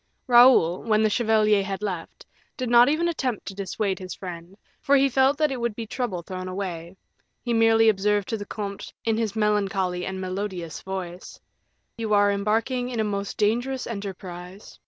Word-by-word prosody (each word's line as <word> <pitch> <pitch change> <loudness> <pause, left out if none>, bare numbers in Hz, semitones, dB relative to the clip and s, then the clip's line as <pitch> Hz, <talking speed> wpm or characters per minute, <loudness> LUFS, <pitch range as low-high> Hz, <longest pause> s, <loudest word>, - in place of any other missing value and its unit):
Raoul, 240 - +6
when 220 -1 +2
the 215 - +2
chevalier 215 -3 +3
had 195 +1 -5
left, 180 -5 -5 0.3
did 255 -3 -3
not 240 +2 +7
even 320 +3 +1
attempt 260 - -2
to 195 - -6
dissuade 195 0 -2
his 185 -1 -7
friend, 175 0 -9 0.2
for 280 - +3
he 275 0 +5
felt 270 +2 +3
that 305 -2 +2
it 255 -3 -4
would 235 -3 -1
be 230 - -5
trouble 210 -7 -3
thrown 185 +1 -6
away; 185 -2 -5 0.5
he 240 - -1
merely 225 0 +4
observed 205 -1 +2
to 225 - -1
the 205 -1 -8
comte, 200 -2 -6
in 225 -1 +2
his 225 -2 -2
melancholy 195 -4 0
and 190 0 -4
melodious 185 -3 -4
voice, 185 -2 -7 0.6
"You 220 -2 +1
are 205 0 +4
embarking 225 +5 0
in 240 -3 -4
a - - +2
most 200 -1 -3
dangerous 245 +5 0
enterprise. 190 -3 -8
210 Hz, 175 wpm, -25 LUFS, 190-235 Hz, 0.6 s, not